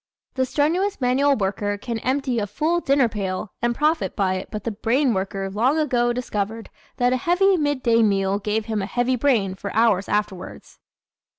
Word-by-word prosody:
The 260 Hz, -1 st, 0 dB
strenuous 350 Hz, +9 st, 0 dB
manual 270 Hz, +2 st, +2 dB
worker 205 Hz, 0 st, -1 dB
can 230 Hz, +2 st, -4 dB
empty 260 Hz, -1 st, -1 dB
a 205 Hz, -, -2 dB
full 315 Hz, -, 0 dB
dinner 275 Hz, -5 st, +2 dB
pail 195 Hz, -2 st, -4 dB
and 240 Hz, 0 st, 0 dB
profit 310 Hz, +4 st, 0 dB
by 190 Hz, -2 st, +1 dB
it 185 Hz, 0 st, -5 dB
but 210 Hz, -2 st, -6 dB
the 230 Hz, -, -2 dB
brain 240 Hz, +5 st, +1 dB
worker 195 Hz, 0 st, -3 dB
long 235 Hz, +10 st, +1 dB
ago 245 Hz, -6 st, +1 dB
discovered 225 Hz, -2 st, -4 dB, 0.3 s
that 245 Hz, 0 st, +2 dB
a -, -, +1 dB
heavy 365 Hz, +7 st, +3 dB
midday 260 Hz, -7 st, +1 dB
meal 195 Hz, -2 st, +1 dB
gave 210 Hz, +1 st, -2 dB
him 215 Hz, -2 st, -2 dB
a 195 Hz, -, -3 dB
heavy 245 Hz, +3 st, 0 dB
brain 230 Hz, -7 st, +1 dB
for 195 Hz, +1 st, -6 dB
hours 215 Hz, -4 st, +2 dB
afterwards. 200 Hz, -3 st, -4 dB
230 Hz, 180 wpm, -22 LUFS, 205-270 Hz, 0.3 s, heavy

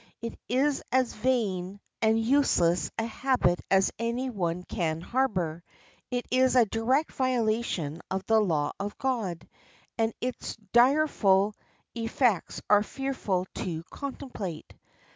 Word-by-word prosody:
It 230 Hz, 0 st, -5 dB, 0.2 s
is 270 Hz, +4 st, +2 dB
as 255 Hz, -2 st, +2 dB
vain 205 Hz, -6 st, -1 dB, 0.2 s
and 220 Hz, 0 st, +3 dB
useless 225 Hz, -9 st, +3 dB
a 225 Hz, -, 0 dB
habit 235 Hz, -7 st, +1 dB
as 195 Hz, 0 st, +4 dB
any 240 Hz, +3 st, -1 dB
one 180 Hz, -4 st, -2 dB
can 160 Hz, -3 st, -2 dB
harbor. 180 Hz, -7 st, -1 dB, 0.5 s
It 245 Hz, -1 st, -2 dB
is 255 Hz, 0 st, +3 dB
a 245 Hz, -2 st, +6 dB
direct 240 Hz, +8 st, +1 dB
violation 220 Hz, -, 0 dB
of 190 Hz, 0 st, -2 dB
the 225 Hz, 0 st, +4 dB
law 160 Hz, -7 st, +1 dB
of 205 Hz, +1 st, -4 dB
God, 225 Hz, -11 st, -2 dB, 0.5 s
and 225 Hz, 0 st, +2 dB
its 250 Hz, 0 st, -4 dB, 0.2 s
direful 240 Hz, -7 st, +4 dB, 0.4 s
effects 230 Hz, -3 st, 0 dB
are 205 Hz, 0 st, +6 dB
fearful 215 Hz, -7 st, -2 dB
to 165 Hz, -3 st, -3 dB
contemplate. 250 Hz, -, -6 dB
225 Hz, 125 wpm, -28 LUFS, 185-255 Hz, 0.5 s, a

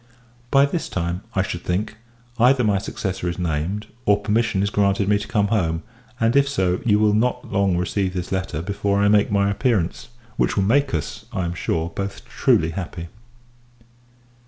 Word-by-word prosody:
By 140 Hz, +2 st, +5 dB
this 160 Hz, +4 st, -3 dB
time, 85 Hz, 0 st, -2 dB
I 95 Hz, -, +2 dB
should 90 Hz, -3 st, -4 dB
think, 105 Hz, +6 st, -2 dB, 0.4 s
either 125 Hz, +2 st, +5 dB
my 105 Hz, -3 st, +2 dB
successor 95 Hz, -2 st, -3 dB
is 85 Hz, -, -4 dB
named, 90 Hz, +4 st, -2 dB, 0.2 s
or 100 Hz, 0 st, +5 dB
permission 110 Hz, -1 st, +1 dB
is 100 Hz, -, -1 dB
granted 100 Hz, -1 st, +2 dB
me 100 Hz, 0 st, +3 dB
to 100 Hz, -, -6 dB
come 105 Hz, -2 st, +1 dB
home; 85 Hz, -6 st, 0 dB, 0.4 s
and, 115 Hz, +2 st, +2 dB
if 140 Hz, 0 st, +4 dB
so, 95 Hz, -9 st, 0 dB
you 105 Hz, -4 st, +3 dB
will 105 Hz, 0 st, +3 dB
not 120 Hz, +4 st, 0 dB
long 95 Hz, -2 st, +2 dB
receive 95 Hz, +1 st, -1 dB
this 90 Hz, -1 st, -4 dB
letter 95 Hz, -5 st, -2 dB
before 100 Hz, +1 st, -1 dB
I 105 Hz, -, +4 dB
make 105 Hz, -1 st, +3 dB
my 100 Hz, 0 st, +2 dB
appearance: 100 Hz, -5 st, -1 dB, 0.3 s
which -, -, +1 dB
will 100 Hz, -, +3 dB
make 135 Hz, +3 st, +2 dB
us, 75 Hz, -, -5 dB
I 95 Hz, -, -2 dB
am 85 Hz, -, -2 dB
sure, 80 Hz, -1 st, -2 dB
both 100 Hz, +3 st, -5 dB
truly 80 Hz, 0 st, +2 dB
happy. 85 Hz, -1 st, -6 dB
100 Hz, 180 wpm, -22 LUFS, 90-105 Hz, 0.4 s, By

